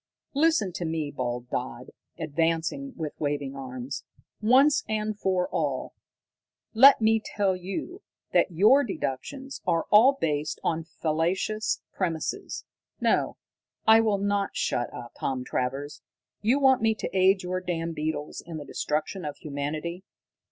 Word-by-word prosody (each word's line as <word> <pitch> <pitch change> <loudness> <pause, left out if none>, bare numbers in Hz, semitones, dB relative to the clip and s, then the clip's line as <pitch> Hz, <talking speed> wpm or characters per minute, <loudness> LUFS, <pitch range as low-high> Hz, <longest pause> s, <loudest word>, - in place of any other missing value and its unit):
"Listen 300 - +3
to 175 - -5
me," 160 -3 -2
bawled 125 -2 -3
Dodd, 125 0 -4 0.3
advancing 165 - -1
with 155 -3 -4
waving 145 -2 -2
arms. 130 0 -6 0.4
"Once 275 +6 +5
and 215 0 -1
for 185 -2 +1
all, 140 -4 -2 0.8
let 265 +3 +8
me 220 0 +4
tell 195 -3 0
you 195 - -5 0.3
that - - +4
your 210 - +5
deductions 265 - -4
are 165 -2 +2
all 230 +7 +8
based 150 -1 -1
upon 160 -1 -2
fallacious 170 +7 -1
premises. 185 - -3 0.3
No, - - +1 0.5
I 220 +1 +7
will 215 -3 +2
not 200 0 0
shut 120 - -1
up, 120 - -8
Tom 130 -2 -2
Travers! 135 +4 -3 0.4
You 230 +6 +3
want 265 -3 +5
me 220 -1 +3
to 200 - -5
aid 190 0 +4
your 185 +1 -2
damned 170 -2 -2
beetles 155 -1 -3
in 165 -2 -7
the 145 - -7
destruction 155 +8 -2
of 150 -1 -5
humanity! 155 +5 -4
170 Hz, 135 wpm, -27 LUFS, 150-215 Hz, 0.8 s, let